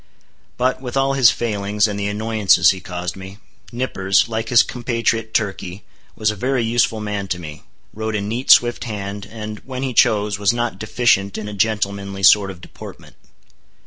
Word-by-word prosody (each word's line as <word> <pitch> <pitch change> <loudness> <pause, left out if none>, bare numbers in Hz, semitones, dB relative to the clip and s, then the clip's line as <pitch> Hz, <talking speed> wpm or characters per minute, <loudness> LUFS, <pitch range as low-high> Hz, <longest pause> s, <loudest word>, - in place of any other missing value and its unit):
But 130 +1 0
with 125 0 -4
all 135 0 +2
his 130 -3 +6
failings, 105 -1 0
and 100 -1 -4
the 100 - -2
annoyances 105 -4 +3
he 95 - -5
caused 90 -1 -5
me, 95 +1 -10 0.3
Nippers, 100 -6 +1
like 115 0 -3
his 120 - +6
compatriot 115 -2 -2
Turkey, 100 -3 -3 0.3
was 110 0 +1
a - - -7
very 125 +4 -1
useful 115 -1 +1
man 105 -2 -4
to 90 - -2
me; 80 -3 -9 0.3
wrote 110 0 -3
a 105 - -1
neat, 115 +6 -4
swift 120 0 +5
hand; 100 -2 -6
and, 110 -1 -7
when 130 0 -6
he 130 -2 -2
chose, 105 -2 +2
was 100 +1 +2
not 120 0 -3
deficient 110 -3 +1
in 110 -1 -5
a 105 - -6
gentlemanly 100 -1 -2
sort 100 0 +6
of 90 -2 -10
deportment. - - -12
105 Hz, 175 wpm, -20 LUFS, 100-115 Hz, 0.3 s, his